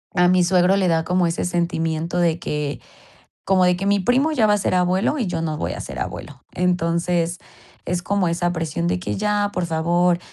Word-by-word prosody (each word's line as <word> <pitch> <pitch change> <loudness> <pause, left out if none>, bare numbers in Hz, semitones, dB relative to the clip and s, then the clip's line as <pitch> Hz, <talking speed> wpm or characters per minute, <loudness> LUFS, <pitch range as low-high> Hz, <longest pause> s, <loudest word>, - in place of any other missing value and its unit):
a 180 -1 +4
mi 180 0 +4
suegro 180 +1 +3
le 190 -2 +1
da 165 -1 +2
como 180 -1 +1
ese 165 - -2
sentimiento 170 -1 -1
de 170 -1 +1
que 150 -4 -3 0.6
como 185 -1 +3
de 180 0 +3
que 195 +2 -4
mi 200 0 +3
primo 255 - +2
ya 235 -8 +3
va 210 - +3
a 205 - +1
ser 190 - 0
abuelo, 185 +9 +1
y 235 - -1
yo 170 -3 -2
no 155 -2 -2
voy - - -3
a - - -6
ser - - -7
abuelo. - - -7
Entonces, 175 -1 0 0.5
es 175 0 -2
como 195 -2 0
esa 175 +1 0
presión 160 - -3
de 90 +1 0
que: 105 +3 -3
"Ya, 210 -1 0
por 180 - -1
favor, 170 +2 +1
175 Hz, 215 wpm, -21 LUFS, 165-185 Hz, 0.6 s, a